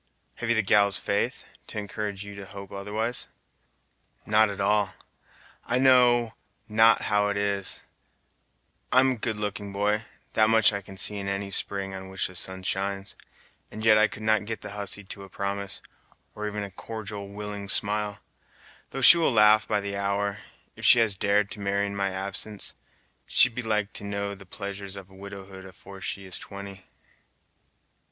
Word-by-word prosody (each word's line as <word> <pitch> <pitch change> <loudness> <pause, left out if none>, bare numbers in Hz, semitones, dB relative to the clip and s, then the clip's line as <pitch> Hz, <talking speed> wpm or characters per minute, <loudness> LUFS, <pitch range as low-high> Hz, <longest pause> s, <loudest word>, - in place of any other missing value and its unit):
"Have 115 -1 -4
you 115 - +4
the 110 - +2
gal's 100 -2 +5
faith, - - -1 0.2
to - - -7
encourage 105 -1 -4
you 100 - -8
to 100 -1 -9
hope 100 -1 -10
otherwise?" 105 +4 -2 1.0
"Not 110 0 +4
at 100 - -6
all. 100 0 +2 0.7
I 125 - 0
know 125 -3 +5 0.3
not 110 +1 +5
how 105 0 +2
it 100 0 -1
is: 100 -1 -1 1.1
I'm 130 0 +4
good 110 0 -2
looking, 105 -1 -4
boy, 105 +3 0 0.3
that 110 0 +4
much 110 -1 +6
I 100 - -2
can 95 0 -12
see 105 +2 +1
in 100 -1 -4
any 100 0 -2
spring 95 0 +1
on 95 0 -7
which 95 0 0
the 90 - -6
sun 95 +1 -3
shines, 95 +1 -2 0.5
and 110 +1 -6
yet 110 -1 +7
I 110 - +5
could 110 - -9
not 110 -1 +2
get 110 0 -5
the 105 - -7
hussy 105 0 -3
to 100 +1 -8
a 95 - -12
promise, 100 0 -4 0.5
or 105 0 -4
even 105 0 -3
a 100 - -7
cordial 105 0 -6
willing 100 0 -6
smile, 105 0 +1 0.7
though 135 - -5
she 170 - +9
will 165 - +3
laugh 110 -1 +6
by 105 - +1
the 100 0 -4
hour. 100 +1 -1 0.4
If - - -12
she - - +8
has 110 -4 +3
dared 100 +1 +2
to 100 - -6
marry 100 0 0
in 100 0 -4
my 100 -1 0
absence, 100 +2 -4 0.5
she'd - - +5
be 125 - -3
like 105 -2 -1
to - - -4
know 100 0 -3
the 100 -1 -13
pleasures 100 -1 -6
of 95 -1 -10
widowhood 95 0 -10
afore 95 +1 -12
she 100 0 -5
is 95 - -4
twenty!" 100 -1 -9
100 Hz, 175 wpm, -27 LUFS, 100-105 Hz, 1.1 s, she